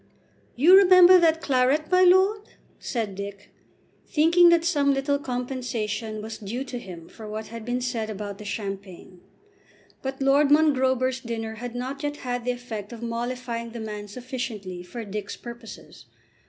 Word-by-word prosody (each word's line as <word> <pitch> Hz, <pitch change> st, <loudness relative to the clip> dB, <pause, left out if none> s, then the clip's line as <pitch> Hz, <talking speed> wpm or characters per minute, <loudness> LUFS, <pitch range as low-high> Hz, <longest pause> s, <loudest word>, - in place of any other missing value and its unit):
"You 325 Hz, +9 st, +7 dB
remember 370 Hz, -1 st, +8 dB
that 325 Hz, -1 st, +3 dB
claret, 275 Hz, +4 st, +1 dB
my 365 Hz, 0 st, +5 dB
lord?" 380 Hz, +3 st, +4 dB, 0.4 s
said 225 Hz, -5 st, -3 dB
Dick, 200 Hz, +1 st, -8 dB, 0.6 s
thinking 335 Hz, +3 st, +5 dB
that 335 Hz, -1 st, +3 dB
some 285 Hz, -5 st, +2 dB
little 280 Hz, +1 st, 0 dB
compensation 245 Hz, -5 st, -4 dB
was 220 Hz, 0 st, -7 dB
due 225 Hz, +6 st, -4 dB
to 250 Hz, -2 st, -6 dB
him 175 Hz, -6 st, -10 dB
for 220 Hz, -2 st, -11 dB
what 215 Hz, +1 st, -6 dB
had 230 Hz, 0 st, -8 dB
been 245 Hz, +2 st, -2 dB
said 235 Hz, -3 st, -2 dB
about 205 Hz, -1 st, -6 dB
the -, -, -8 dB
champagne. 195 Hz, -3 st, -7 dB, 0.8 s
But 270 Hz, 0 st, -5 dB
Lord 275 Hz, +1 st, +3 dB
Mongrober's 260 Hz, -4 st, +3 dB
dinner 230 Hz, -3 st, -5 dB
had 240 Hz, +2 st, -7 dB
not 260 Hz, +3 st, -4 dB
yet 290 Hz, 0 st, -3 dB
had 245 Hz, -1 st, -3 dB
the 250 Hz, -, +1 dB
effect 235 Hz, -4 st, -7 dB
of 235 Hz, -1 st, -9 dB
mollifying 235 Hz, 0 st, -4 dB
the 235 Hz, -, -6 dB
man 210 Hz, -1 st, -6 dB
sufficiently 230 Hz, -6 st, -6 dB
for 225 Hz, +6 st, -8 dB
Dick's 205 Hz, 0 st, -6 dB
purposes. 235 Hz, -2 st, -11 dB
245 Hz, 155 wpm, -25 LUFS, 215-275 Hz, 0.8 s, remember